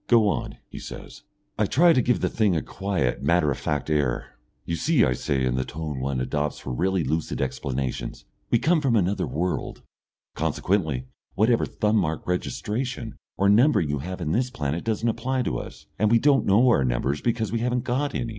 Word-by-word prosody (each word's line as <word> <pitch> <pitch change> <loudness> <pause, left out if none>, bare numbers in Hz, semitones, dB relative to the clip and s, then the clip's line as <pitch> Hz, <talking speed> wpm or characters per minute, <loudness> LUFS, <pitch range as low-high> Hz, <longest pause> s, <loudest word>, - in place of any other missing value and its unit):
"Go 115 -3 +5
on," 100 - -2
he - - -9
says. - - -9 0.4
I - - +3
try 170 +4 +5
to 130 - +3
give 125 0 +1
the - - +1
thing 105 -5 +2
a 80 - 0
quiet, 95 -10 -2
matter 75 0 +2
of 65 - -2
fact 75 -1 -2
air. 75 -6 -1 0.3
"You 85 - -2
see," 145 - +3
I 65 - +1
say, 65 +1 -1
in 65 - +1
the 65 - +1
tone 75 -1 -5
one 65 0 -2
adopts 75 +3 -1
for - - -6
really 95 +5 +1
lucid 80 +1 -2
explanations, 65 -1 -3 0.2
"we - - +4
come 160 +6 +2
from 130 -5 +2
another 100 -1 +1
world. 90 +5 -3 0.5
Consequently, 80 -10 -1 0.3
whatever 115 +4 +3
thumb 105 +1 +1
mark 80 -5 -1
registration 115 +6 -3 0.2
or 100 - +2
numbering 105 - +4
you 75 -1 -1
have 90 +5 -6
in 80 -2 -1
this 125 +7 +1
planet 75 - -3
doesn't 115 +1 -1
apply 125 +3 0
to - - -2
us, - - -10
and 105 +1 +3
we 115 - +5
don't 140 +3 +3
know 110 +6 +5
our 115 - +4
numbers 65 +3 -1
because 115 -3 -1
we 115 - 0
haven't 125 +1 0
got 135 +4 -1
any. 120 - -2
95 Hz, 200 wpm, -25 LUFS, 75-120 Hz, 0.5 s, Go